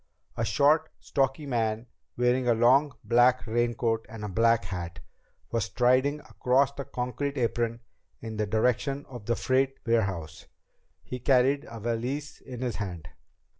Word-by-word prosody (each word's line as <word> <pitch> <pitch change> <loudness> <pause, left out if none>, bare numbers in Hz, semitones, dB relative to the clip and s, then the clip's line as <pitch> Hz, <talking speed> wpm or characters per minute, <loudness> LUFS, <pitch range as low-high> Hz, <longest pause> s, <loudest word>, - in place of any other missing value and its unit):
A 115 - -2
short, 155 +6 +3
stocky 135 +1 -1
man, 115 -3 -1 0.3
wearing 125 +1 +2
a 120 - +4
long 130 +4 +4
black 125 +2 +4
raincoat 115 -1 0
and 110 -1 -7
a - - -4
black 115 +1 +3
hat, 90 -1 -5 0.5
was 115 -2 0
striding 130 +7 +2
across 135 +2 +1
the 140 -1 -6
concrete 140 +3 -3
apron 115 -1 -1 0.4
in 110 -1 -7
the 105 0 0
direction 125 +6 0
of 120 -5 -10
the 120 - +2
freight 135 +2 +1
warehouse. 95 -9 -1 0.6
He 125 - -6
carried 135 +2 +3
a 115 - -8
valise 120 +6 -3
in 125 -2 -8
his 125 -2 -2
hand. 90 -6 -6
120 Hz, 145 wpm, -28 LUFS, 115-135 Hz, 0.6 s, a